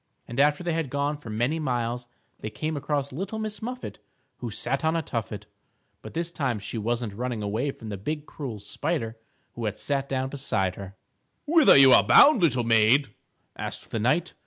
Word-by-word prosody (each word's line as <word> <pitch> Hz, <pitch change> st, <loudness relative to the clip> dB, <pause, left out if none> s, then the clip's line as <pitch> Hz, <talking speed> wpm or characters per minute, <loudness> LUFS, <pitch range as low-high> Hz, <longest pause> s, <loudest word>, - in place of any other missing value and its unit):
And 120 Hz, +3 st, -5 dB
after 150 Hz, +3 st, +3 dB
they 175 Hz, -1 st, -1 dB
had 160 Hz, -4 st, -2 dB
gone 145 Hz, +2 st, -1 dB
for 145 Hz, -6 st, -11 dB
many 120 Hz, +9 st, 0 dB
miles, 120 Hz, -4 st, -2 dB, 0.3 s
they 110 Hz, -, -5 dB
came 155 Hz, +9 st, -3 dB
across 145 Hz, -1 st, -2 dB
Little 195 Hz, +10 st, -4 dB
Miss 215 Hz, -1 st, -4 dB
Muffet 250 Hz, +3 st, -6 dB, 0.4 s
who -, -, -5 dB
sat -, -, -2 dB
on 160 Hz, +1 st, +2 dB
a 165 Hz, -, 0 dB
tuffet. 110 Hz, -5 st, -4 dB, 0.6 s
But -, -, -11 dB
this 170 Hz, +1 st, -2 dB
time 135 Hz, -9 st, -1 dB
she 105 Hz, +3 st, -5 dB
wasn't 115 Hz, 0 st, -2 dB
running 120 Hz, 0 st, -3 dB
away 110 Hz, +7 st, -1 dB
from 115 Hz, -5 st, -8 dB
the 100 Hz, -, -4 dB
big 150 Hz, +9 st, -4 dB
cruel 130 Hz, -9 st, -6 dB
spider 115 Hz, -, -3 dB, 0.4 s
who 120 Hz, -, -5 dB
had 105 Hz, -1 st, -2 dB
sat 140 Hz, -1 st, -2 dB
down 130 Hz, 0 st, -1 dB
beside 115 Hz, -10 st, -1 dB
her. 95 Hz, 0 st, -9 dB, 0.5 s
"Whither 315 Hz, 0 st, +6 dB
are -, -, +7 dB
you 135 Hz, -1 st, +8 dB
bound, 285 Hz, -8 st, +7 dB
little 130 Hz, -8 st, +2 dB
maid?" 115 Hz, +2 st, +4 dB, 0.4 s
asked -, -, -6 dB
the 115 Hz, -, -1 dB
knight. 150 Hz, +11 st, +1 dB
135 Hz, 190 wpm, -26 LUFS, 115-155 Hz, 0.6 s, you